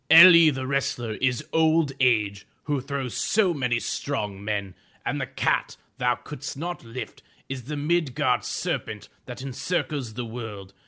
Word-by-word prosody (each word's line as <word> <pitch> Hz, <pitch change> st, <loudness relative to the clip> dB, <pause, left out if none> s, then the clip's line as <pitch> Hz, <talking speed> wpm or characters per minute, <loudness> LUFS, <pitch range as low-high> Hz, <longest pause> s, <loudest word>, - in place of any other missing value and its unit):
El'li 170 Hz, 0 st, +10 dB
the 130 Hz, -3 st, -3 dB
wrestler, 130 Hz, -4 st, -1 dB
is 125 Hz, -2 st, +1 dB
old 160 Hz, -2 st, +3 dB
age, 105 Hz, -6 st, +2 dB, 0.2 s
who 145 Hz, -3 st, -1 dB
throws 135 Hz, -2 st, -4 dB
so 205 Hz, -5 st, +2 dB
many 125 Hz, -5 st, 0 dB
strong 105 Hz, -8 st, -3 dB
men, 100 Hz, -3 st, -2 dB, 0.3 s
and -, -, -1 dB
the -, -, -2 dB
cat -, -, 0 dB, 0.2 s
thou 125 Hz, 0 st, +2 dB
couldst 140 Hz, -1 st, -7 dB
not 175 Hz, +2 st, -4 dB
lift 130 Hz, +4 st, -7 dB, 0.3 s
is 130 Hz, -3 st, -5 dB
the 150 Hz, +2 st, -4 dB
Mid'gard 150 Hz, -3 st, +1 dB
serpent -, -, -3 dB, 0.2 s
that -, -, -7 dB
encircles 135 Hz, -3 st, -3 dB
the 125 Hz, 0 st, -3 dB
world. 110 Hz, -4 st, -7 dB
130 Hz, 150 wpm, -25 LUFS, 115-150 Hz, 0.3 s, El'li